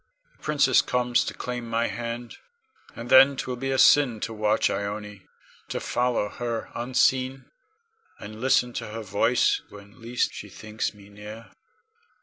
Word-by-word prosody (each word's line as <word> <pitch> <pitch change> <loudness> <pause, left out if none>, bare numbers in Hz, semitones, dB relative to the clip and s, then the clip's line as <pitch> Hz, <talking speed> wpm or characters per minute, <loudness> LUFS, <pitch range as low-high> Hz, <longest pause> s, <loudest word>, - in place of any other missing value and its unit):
The - - -32
princess 140 -4 +3
comes 125 -1 +1
to - - -5
claim 125 -2 -5
my 115 +1 +1
hand, 120 0 -5 0.6
and 115 - -7
then 135 +1 +7
'twill 125 - -3
be 135 +2 -4
a 135 - 0
sin 130 -5 +5
to 115 - -3
watch 105 0 +1
Ione, 105 -1 -5 0.4
to - - -3
follow 120 -4 0
her 120 0 -4
unseen, 130 +2 +1 0.7
and 110 +1 -10
listen 125 -1 +2
to - - -5
her 110 +1 -6
voice 105 +5 +2
when 100 +3 -15
least 120 +2 -1
she 105 - -8
thinks 110 +2 -5
me 100 -1 -16
near. 105 +2 -11
115 Hz, 150 wpm, -25 LUFS, 105-125 Hz, 0.7 s, then